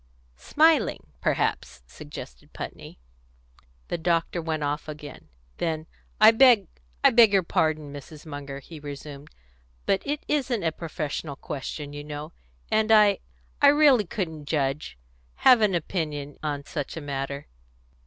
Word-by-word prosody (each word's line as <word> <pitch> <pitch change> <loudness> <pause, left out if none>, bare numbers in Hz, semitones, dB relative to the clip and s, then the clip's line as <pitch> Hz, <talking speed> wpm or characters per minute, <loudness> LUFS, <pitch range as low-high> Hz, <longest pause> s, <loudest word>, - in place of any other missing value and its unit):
"Smiling, 305 - +2
perhaps," 65 -1 -1
suggested 60 -1 -11
Putney. - - -8 0.9
The - - -2
doctor 170 +1 0
went 160 -2 -2
off 145 +1 -2
again. 150 - -9 0.3
Then, 160 -2 -2 0.3
"I 215 +1 +9
beg 230 -3 +6 0.4
I - - +7
beg 230 -3 +7
your 195 -2 +3
pardon, 155 -3 0
Mrs. 145 +2 -11
Munger," 140 -2 -7
he 160 +3 -11
resumed. 145 0 -8 0.6
"But 195 - +2
it 295 +1 -3
isn't 260 -8 0
a 160 - +1
professional 155 -2 -5
question, 145 +1 -6
you 145 0 -6
know; 150 +2 -7 0.4
and 220 0 +2
I 210 -2 +6 0.4
I 285 - +8
really 285 -6 +6
couldn't 160 -9 -4
judge 140 - -2 0.4
have 250 -3 +6
any 200 -4 +3
opinion 150 -4 -4
on 145 -2 -3
such 145 +1 -5
a - - -4
matter." 140 0 -4
155 Hz, 135 wpm, -26 LUFS, 145-205 Hz, 0.9 s, I